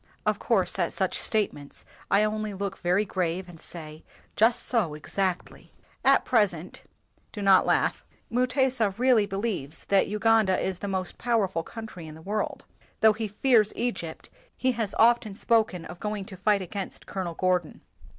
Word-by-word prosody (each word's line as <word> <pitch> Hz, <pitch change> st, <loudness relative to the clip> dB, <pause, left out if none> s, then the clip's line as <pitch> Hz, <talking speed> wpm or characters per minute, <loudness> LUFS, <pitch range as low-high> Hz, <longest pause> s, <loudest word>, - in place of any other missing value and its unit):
" -, -, -38 dB
"Of -, -, +1 dB
course, -, -, 0 dB
at -, -, 0 dB
such -, -, -1 dB
statements 195 Hz, -10 st, -3 dB, 0.2 s
I 200 Hz, +2 st, +4 dB
only 215 Hz, -1 st, -2 dB
look 195 Hz, 0 st, -4 dB
very 180 Hz, +4 st, +2 dB
grave, 180 Hz, -1 st, -2 dB
and 170 Hz, -3 st, -13 dB
say, 155 Hz, -2 st, -8 dB, 0.3 s
'Just 225 Hz, +2 st, +3 dB
so, 200 Hz, -11 st, 0 dB
exactly.' 185 Hz, +4 st, -3 dB, 0.3 s
At -, -, +4 dB
present, 190 Hz, -8 st, 0 dB, 0.5 s
(do 210 Hz, -, -8 dB
not 195 Hz, -1 st, +5 dB
laugh) -, -, +1 dB, 0.3 s
Mutesa 250 Hz, -4 st, +1 dB
really 240 Hz, -4 st, +4 dB
be 195 Hz, -, -5 dB
lieves 190 Hz, -9 st, -3 dB
that 195 Hz, -1 st, +4 dB
Uganda 210 Hz, -2 st, +3 dB
is 190 Hz, -2 st, -2 dB
the 205 Hz, -, -4 dB
most 190 Hz, -2 st, -3 dB
powerful 205 Hz, -8 st, +1 dB
country 215 Hz, -4 st, -9 dB
in 155 Hz, -, -9 dB
the 160 Hz, -, -13 dB
world. 210 Hz, +3 st, -3 dB, 0.4 s
Though 220 Hz, -1 st, +7 dB
he 220 Hz, 0 st, -3 dB
fears 215 Hz, 0 st, +3 dB
Egypt, 230 Hz, -9 st, -4 dB, 0.3 s
he 260 Hz, -, +2 dB
has 225 Hz, -4 st, -3 dB
often 225 Hz, -3 st, +4 dB
spoken 220 Hz, -6 st, +1 dB
of 175 Hz, -, -9 dB
going 210 Hz, -2 st, -3 dB
to 190 Hz, -, -10 dB
fight 200 Hz, +1 st, +1 dB
against 190 Hz, +1 st, -6 dB
Colonel 180 Hz, -4 st, -4 dB
Gordon. 180 Hz, -3 st, 0 dB
200 Hz, 165 wpm, -27 LUFS, 180-220 Hz, 0.5 s, Though